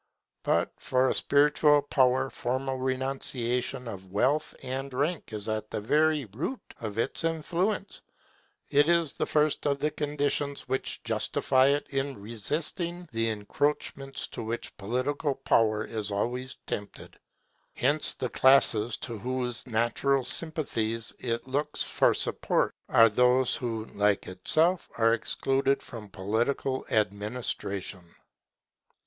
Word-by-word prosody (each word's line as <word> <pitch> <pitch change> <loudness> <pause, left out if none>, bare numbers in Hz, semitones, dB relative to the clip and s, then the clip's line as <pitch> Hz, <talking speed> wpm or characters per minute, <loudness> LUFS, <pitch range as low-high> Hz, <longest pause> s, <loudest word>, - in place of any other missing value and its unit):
But - - +1
for 130 0 +2
a - - +2
spiritual 145 0 +4
power 130 -1 +2
formal 130 +2 -2
renunciation 130 -1 -2
of 95 -4 -8
wealth 135 +9 +1
and 135 +2 -4
rank 145 +2 -1
is 105 -1 -5
at 110 -1 -2
the - - -3
very 150 +5 +2
root 140 - -4 0.2
of 110 -2 -5
its 115 +7 0
influence; 175 +5 -1 0.7
it 145 +3 +4
is 170 -4 +3
the - - -2
first 150 -1 +2
of 140 -1 +2
the 150 +2 0
conditions 145 -1 -1
which 130 +1 -2
justify 130 0 +2
it 145 +1 +2
in 135 -2 -2
resisting 160 - -2
the 115 0 0
encroachments 135 +5 -2
to - - -6
which 115 +1 -5
political 130 +7 -1
power 110 -3 +2
is 110 -2 -4
always 125 +5 -2
tempted. 105 -1 -6 0.6
Hence 145 +4 +1
the 125 - -3
classes 120 -4 +4
to 115 -3 -6
whose 125 +1 -3
natural 120 +4 +1
sympathies 120 -6 -2
it 115 0 -3
looks 145 +3 -1
for - - +2
support - - +1 0.2
are 115 - +7
those 125 +3 +3
who, 115 -3 -3
like 105 -1 +2
itself, 155 - +1
are 115 0 +4
excluded 135 +4 0
from 110 -4 -9
political 120 +7 -1
administration. 100 -4 -2
130 Hz, 125 wpm, -28 LUFS, 110-145 Hz, 0.7 s, are